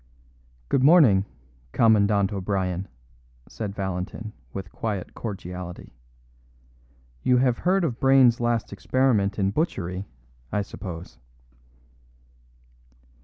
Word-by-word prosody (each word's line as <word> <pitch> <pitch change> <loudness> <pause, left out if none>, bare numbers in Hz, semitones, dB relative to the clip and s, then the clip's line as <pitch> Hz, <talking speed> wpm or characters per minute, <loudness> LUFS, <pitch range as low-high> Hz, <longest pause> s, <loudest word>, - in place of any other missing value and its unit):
"Good 130 - +1
morning, 135 - +6 0.5
Commandant 105 -3 +3
O'Brien," 95 -1 -2 0.6
said 105 -3 -6
Valentin, 95 +3 -4 0.2
with 95 - -7
quiet 105 -5 -4
cordiality. 90 - -7 1.3
"You 125 - +3
have 125 -1 +2
heard 185 +1 +2
of 125 -8 -2
Brayne's 135 -3 +5
last 120 -3 -1
experiment 105 -2 +1
in 100 -1 +1
butchery, 95 - -2 0.4
I 105 - 0
suppose?" 85 - -8
100 Hz, 90 wpm, -25 LUFS, 95-120 Hz, 1.3 s, morning